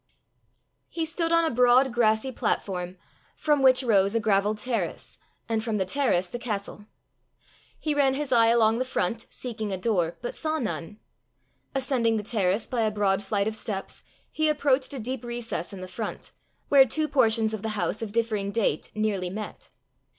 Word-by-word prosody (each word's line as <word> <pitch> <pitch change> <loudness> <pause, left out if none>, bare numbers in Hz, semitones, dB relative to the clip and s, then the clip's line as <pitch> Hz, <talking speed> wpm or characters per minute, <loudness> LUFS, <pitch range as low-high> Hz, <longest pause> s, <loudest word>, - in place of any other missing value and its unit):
He 330 -1 -2
stood 330 +1 -1
on 335 0 +4
a 320 - 0
broad 250 +1 +4
grassy 225 +2 +2
platform, 185 -6 -2 0.4
from 295 -2 +1
which 260 0 +5
rose 200 -3 +3
a - - +3
gravelled 210 0 +1
terrace, 235 +2 -3 0.3
and 225 -1 -1
from 225 -2 -1
the 190 - 0
terrace 185 -5 +1
the 240 - -6
castle. 210 -2 -5 0.9
He 305 - -1
ran 275 -2 +3
his 290 0 -3
eye 230 -2 +5
along 230 0 +4
the - - +1
front 230 -2 -2
seeking 220 -4 -5
a 190 - -2
door 175 -5 0
but 240 - -5
saw 315 0 -2
none. 210 - -4 0.8
Ascending 250 -4 +1
the 210 - -3
terrace 205 -1 0
by 245 -2 -2
a 220 - +2
broad 205 -2 +1
flight 200 +1 0
of 220 - -2
steps, 200 -3 -4 0.3
he 310 0 +1
approached 280 -3 +1
a - - -4
deep 255 +3 -4
recess 235 -8 -3
in 195 -2 -8
the 185 - -6
front, 215 +4 -5 0.4
where 280 -1 +7
two 305 +5 0
portions 225 -6 +3
of 215 - -4
the 220 - -3
house 205 - -1
of 220 -2 -4
differing 215 -3 -1
date 200 -8 0
nearly 205 -4 -1
met. 210 +3 -7
225 Hz, 180 wpm, -26 LUFS, 205-255 Hz, 0.9 s, where